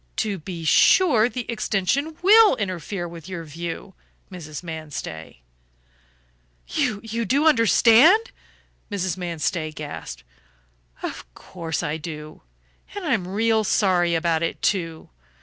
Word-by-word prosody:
To 205 -3 -2
be 165 0 -7
sure, 240 - +5
the 250 -2 -5
extension 235 - -1
WILL 425 -1 +7
interfere 185 - -4
with 170 0 -11
your 175 -3 -5
view, 165 +4 -7 0.4
Mrs. 160 -3 -8
Manstey." 150 - -7 1.2
"You 225 - -2
do 275 +8 +1
understand?" 295 - +5 0.6
Mrs. 190 -4 -2
Manstey 170 -2 -3
gasped. 80 - -8 0.8
"Of - - -6
course 165 -3 -5
I 150 -1 -2
do. 155 -1 -8 0.5
And 405 -3 -5
I'm 230 - 0
real 220 +3 +1
sorry 180 -4 +2
about 165 -1 +1
it, 165 - -2
too. 165 - -2
185 Hz, 115 wpm, -23 LUFS, 160-225 Hz, 1.2 s, WILL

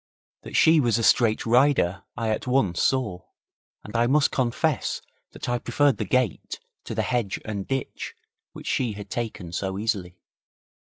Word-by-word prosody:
That - - -9
she 160 0 +6
was 120 -5 +2
a 115 - -1
straight 110 -1 +3
rider 120 -7 +3 0.2
I 115 -2 -1
at 110 - -2
once 115 -10 +2
saw, 115 -9 +1 0.6
and 105 - -10
I 120 +1 +3
must 145 +3 +3
confess 130 +3 0 0.3
that - - -8
I 120 0 0
preferred 145 +2 +2
the 110 - -2
gate 120 -2 -1 0.3
to - - -5
the - - +1
hedge 120 -6 -1
and 100 -3 -4
ditch 135 -1 -4 0.4
which - - -11
she 120 -4 0
had 100 -1 -9
taken 110 -7 -4
so 95 +2 -3
easily. 100 -5 -2
115 Hz, 165 wpm, -25 LUFS, 100-130 Hz, 0.6 s, she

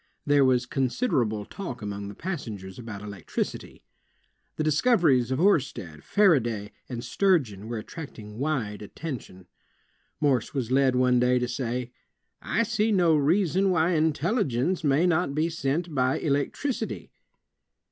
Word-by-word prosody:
There 145 -1 +4
was 130 -2 +3
considerable 125 - 0
talk 130 - -7
among 100 -1 -5
the 100 - -8
passengers 110 - -6
about 110 -4 -7
electricity. 100 -4 -5 0.7
The 155 - -1
discoveries 155 - +3
of 130 - 0
Oersted, 135 - +1
Faraday, 120 - +2 0.2
and 120 -2 -5
Sturgeon 125 - +1
were 120 0 -3
attracting 110 -4 -9
wide 125 -9 -2
attention. 105 - -7 0.7
Morse 140 -2 +1
was 125 -3 -2
led 130 -1 +3
one 125 -1 +3
day 125 +1 +3
to 125 0 0
say: 120 0 -3 0.5
"I 230 - +1
see 220 -1 0
no 175 -5 +4
reason 180 +5 +2
why 170 -1 +2
intelligence 160 - +1
may 145 +3 +3
not 170 -4 +1
be 160 +2 +1
sent 160 +2 -2
by 130 -1 +1
electricity." 190 - -2
135 Hz, 130 wpm, -26 LUFS, 120-165 Hz, 0.7 s, There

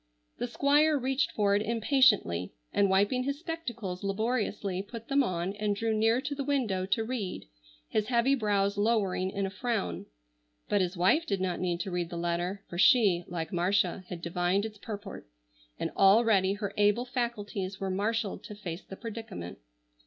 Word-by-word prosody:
The 245 - -1
Squire 290 +4 +3
reached 265 +1 0
for 200 -1 +2
it 205 - +2
impatiently, 220 - +2 0.2
and 200 -1 +3
wiping 200 +6 +3
his 280 +2 -2
spectacles 240 - -5
laboriously 205 -2 -1
put 225 +3 -9
them 280 0 +4
on 185 -5 -1
and 210 -1 0
drew 225 +2 0
near 225 +3 +3
to 290 - -3
the 280 0 -3
window 235 -10 0
to 220 +3 +1
read, 220 - -4 0.4
his 215 -1 0
heavy 245 +2 +3
brows 205 -4 +1
lowering 205 -4 +1
in 195 +1 -2
a 190 - -4
frown. 190 - -2 0.6
But 205 - +2
his 180 0 -2
wife 300 - +3
did 200 -7 0
not 185 -1 -1
need 175 -1 -1
to 190 - -4
read 175 -1 -2
the 175 - -5
letter, 175 +3 -2
for 175 - -6
she, 190 -6 +5
like 170 +1 -4
Marcia, 185 +1 +1
had 170 -2 -7
divined 180 +4 0
its 215 -2 -8
purport, 205 - -7 0.5
and - - -2
already 195 -1 +4
her 205 0 -4
able 210 +4 +3
faculties 210 -6 -3
were 195 -1 -2
marshalled 210 +2 -1
to 210 - -8
face 180 -3 -6
the 195 - -10
predicament. 220 - -7
205 Hz, 175 wpm, -29 LUFS, 185-235 Hz, 0.6 s, she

